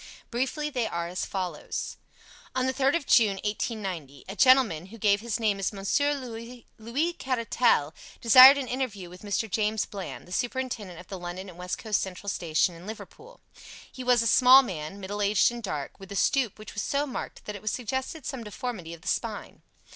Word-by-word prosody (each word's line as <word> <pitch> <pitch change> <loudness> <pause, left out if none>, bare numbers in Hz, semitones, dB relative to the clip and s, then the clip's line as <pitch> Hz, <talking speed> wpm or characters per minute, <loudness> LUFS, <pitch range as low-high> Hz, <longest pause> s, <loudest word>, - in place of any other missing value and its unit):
Briefly, 270 +5 -2
they 245 -5 -1
are 170 -3 -3
as 180 +1 -4
follows: 180 -5 -4 0.6
On 255 0 +1
the 260 - 0
3rd 270 +2 +2
of 335 - -1
June, 215 -6 +4
1890, 190 - -4
a 195 - -6
gentleman, 250 - +4
who 225 +4 -12
gave 205 -1 +2
his 235 0 -2
name 210 -3 +1
as 195 - -1
Monsieur 285 +9 +1
Louis 245 +4 -5
Caratal, 230 - +1 0.3
desired 255 +4 +9
an 270 -2 -3
interview 225 -9 -4
with 180 - -12
Mr. 210 +2 -1
James 215 +1 0
Bland, 195 -3 -8
the - - -15
superintendent 240 -5 -3
of 180 - -12
the 190 - -6
London 175 +2 -6
and 175 - -13
West 180 0 -3
Coast 215 -3 0
Central 190 +1 -5
Station 170 -1 +1
in 170 +3 -12
Liverpool. 445 - -10 0.5
He 255 - -8
was 245 -2 +4
a - - -3
small 255 +4 +7
man, 175 -3 -6
middle 200 +2 -4
aged 205 +2 +4
and 240 0 -7
dark, 150 -10 -5
with 195 0 -12
a - - -5
stoop 245 +3 +1
which 215 - -10
was 205 - -3
so 285 +6 0
marked 265 - -7
that 210 - -5
it 210 +2 -3
suggested 260 +6 -4
some 265 -4 -4
deformity 210 -6 -6
of 165 - -19
the 185 - -12
spine. 220 +1 -3
215 Hz, 190 wpm, -27 LUFS, 190-255 Hz, 0.6 s, desired